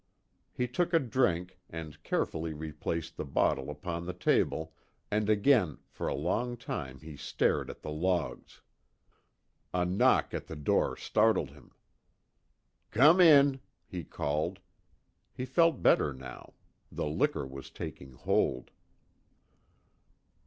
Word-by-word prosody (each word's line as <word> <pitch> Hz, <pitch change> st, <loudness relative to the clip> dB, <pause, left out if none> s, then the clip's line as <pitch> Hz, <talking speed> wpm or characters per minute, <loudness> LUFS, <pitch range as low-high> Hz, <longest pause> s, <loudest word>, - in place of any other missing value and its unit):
He 125 Hz, -, -2 dB
took 175 Hz, +8 st, -1 dB
a -, -, +6 dB
drink, 95 Hz, -, 0 dB
and 80 Hz, -2 st, -8 dB
carefully 80 Hz, 0 st, -2 dB
replaced 80 Hz, +2 st, -4 dB
the -, -, -3 dB
bottle 70 Hz, -1 st, 0 dB
upon 85 Hz, +3 st, -5 dB
the 90 Hz, -, -3 dB
table, 80 Hz, -2 st, +1 dB, 0.4 s
and 105 Hz, 0 st, +1 dB
again 105 Hz, -, +3 dB
for -, -, -4 dB
a -, -, -1 dB
long 120 Hz, +2 st, -1 dB
time 65 Hz, -, -6 dB
he 80 Hz, -1 st, -9 dB
stared 70 Hz, 0 st, 0 dB
at -, -, -10 dB
the 75 Hz, -, -5 dB
logs. 85 Hz, +2 st, -2 dB, 1.1 s
A 90 Hz, 0 st, +2 dB
knock 90 Hz, +2 st, +3 dB
on -, -, -2 dB
the -, -, -7 dB
door 75 Hz, -1 st, +1 dB
startled 110 Hz, -10 st, +2 dB
him. 75 Hz, +1 st, -17 dB, 1.2 s
"Come 150 Hz, +10 st, +6 dB
in," 140 Hz, -5 st, +7 dB, 0.3 s
he 90 Hz, -2 st, -6 dB
called. 75 Hz, +5 st, -2 dB, 0.8 s
He 125 Hz, -, -3 dB
felt 165 Hz, +3 st, +2 dB
better 70 Hz, -, +4 dB
now. 65 Hz, 0 st, -10 dB, 0.4 s
The -, -, -3 dB
liquor 75 Hz, -1 st, 0 dB
was 65 Hz, 0 st, -9 dB
taking 65 Hz, -1 st, -8 dB
hold. 60 Hz, -, 0 dB
85 Hz, 125 wpm, -30 LUFS, 75-115 Hz, 1.2 s, in